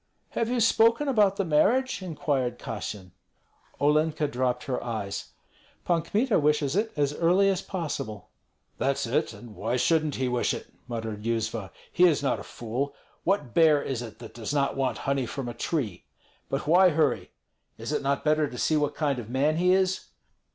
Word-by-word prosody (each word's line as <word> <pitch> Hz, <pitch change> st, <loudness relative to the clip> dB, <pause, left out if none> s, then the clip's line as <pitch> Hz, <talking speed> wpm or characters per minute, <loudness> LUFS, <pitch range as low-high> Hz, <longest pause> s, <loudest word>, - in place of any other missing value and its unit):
"Have 230 Hz, -, -1 dB
you 250 Hz, 0 st, 0 dB
spoken 230 Hz, +4 st, +4 dB
about 210 Hz, -7 st, +3 dB
the 195 Hz, -, -1 dB
marriage?" 230 Hz, +11 st, +2 dB
inquired 145 Hz, -7 st, -1 dB
Kassyan. 105 Hz, -4 st, -6 dB, 0.7 s
Olenka 150 Hz, +1 st, +2 dB
dropped 125 Hz, -1 st, -1 dB
her 135 Hz, -4 st, -3 dB
eyes: 110 Hz, -4 st, -4 dB, 0.5 s
"Pan 170 Hz, -2 st, +2 dB
Kmita 220 Hz, -, +1 dB
wishes 150 Hz, -1 st, +1 dB
it 220 Hz, +2 st, +1 dB
as 145 Hz, -1 st, +1 dB
early 180 Hz, +5 st, +3 dB
as 190 Hz, -1 st, 0 dB
possible." 150 Hz, -, -5 dB, 0.5 s
"That's -, -, 0 dB
it! -, -, 0 dB
and 120 Hz, -3 st, -11 dB
why 115 Hz, +2 st, -1 dB
shouldn't 155 Hz, +2 st, +2 dB
he 130 Hz, -, -1 dB
wish 125 Hz, -1 st, 0 dB
it?" -, -, -10 dB
muttered 110 Hz, -3 st, -4 dB
Yuzva; 115 Hz, -3 st, -2 dB, 0.2 s
"he 180 Hz, -, +5 dB
is 155 Hz, -5 st, +3 dB
not 135 Hz, -, +1 dB
a -, -, -7 dB
fool! 130 Hz, +5 st, -4 dB, 0.3 s
What 155 Hz, -, 0 dB
bear 160 Hz, -3 st, +5 dB
is 135 Hz, -4 st, -3 dB
it 115 Hz, -3 st, -8 dB
that 115 Hz, -2 st, -11 dB
does 115 Hz, +1 st, -5 dB
not 140 Hz, -1 st, +1 dB
want 135 Hz, -2 st, 0 dB
honey 135 Hz, -2 st, 0 dB
from 135 Hz, -1 st, -5 dB
a 120 Hz, -, -4 dB
tree? 120 Hz, -, -3 dB, 0.4 s
But 135 Hz, -, -2 dB
why 180 Hz, +4 st, +6 dB
hurry? 155 Hz, -5 st, +1 dB, 0.5 s
Is -, -, -5 dB
it -, -, 0 dB
not 140 Hz, 0 st, -1 dB
better 155 Hz, 0 st, +3 dB
to 125 Hz, -, -8 dB
see 155 Hz, +5 st, +2 dB
what 150 Hz, -1 st, 0 dB
kind 145 Hz, -4 st, 0 dB
of 115 Hz, -2 st, -8 dB
man 145 Hz, +5 st, +1 dB
he 180 Hz, +1 st, +3 dB
is? 190 Hz, 0 st, +2 dB
145 Hz, 180 wpm, -27 LUFS, 125-175 Hz, 0.7 s, why